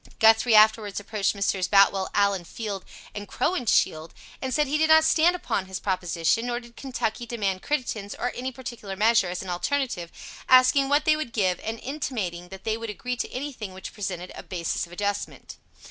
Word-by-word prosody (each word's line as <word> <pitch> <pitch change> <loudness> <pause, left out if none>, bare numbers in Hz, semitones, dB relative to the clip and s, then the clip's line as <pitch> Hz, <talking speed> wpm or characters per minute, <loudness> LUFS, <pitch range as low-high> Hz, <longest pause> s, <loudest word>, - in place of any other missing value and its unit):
Guthrie 225 +1 +5
afterwards 215 -1 +4
approached 205 0 -1
Messrs. 195 -2 0
Boutwell, 195 0 +4
Allen, 200 -3 +2
Field, 200 +2 -5 0.3
and 205 0 -7
Crowninshield, 200 - 0 0.3
and 260 - -3
said 300 +4 +2
he 295 +2 -1
did 315 0 +3
not 315 0 +7
stand 330 +2 +4
upon 200 - -2
his 190 0 -5
proposition, 180 +3 0
nor 240 0 -1
did 235 -1 -16
Kentucky 240 -3 -3
demand 200 -5 -2
Crittenden's, 235 -8 -3
or 245 - -2
any 255 +1 -4
particular 240 -6 -7
measure, 220 0 +3
as 180 +1 -4
an 190 - -8
alternative, 180 -2 -2 0.4
asking 255 +2 +6
what 290 +1 +3
they 310 - +5
would 290 -7 -5
give, 185 -5 +1
and 225 +1 -5
intimating 210 - -4
that 190 0 -10
they 220 0 -1
would 230 -1 -6
agree 250 +5 -4
to - - -4
anything 250 -8 -6
which 190 - -8
presented 185 -3 -5
a - - -8
basis 170 -1 -3
of - - -19
adjustment. 205 +2 -4
215 Hz, 185 wpm, -25 LUFS, 190-255 Hz, 0.4 s, not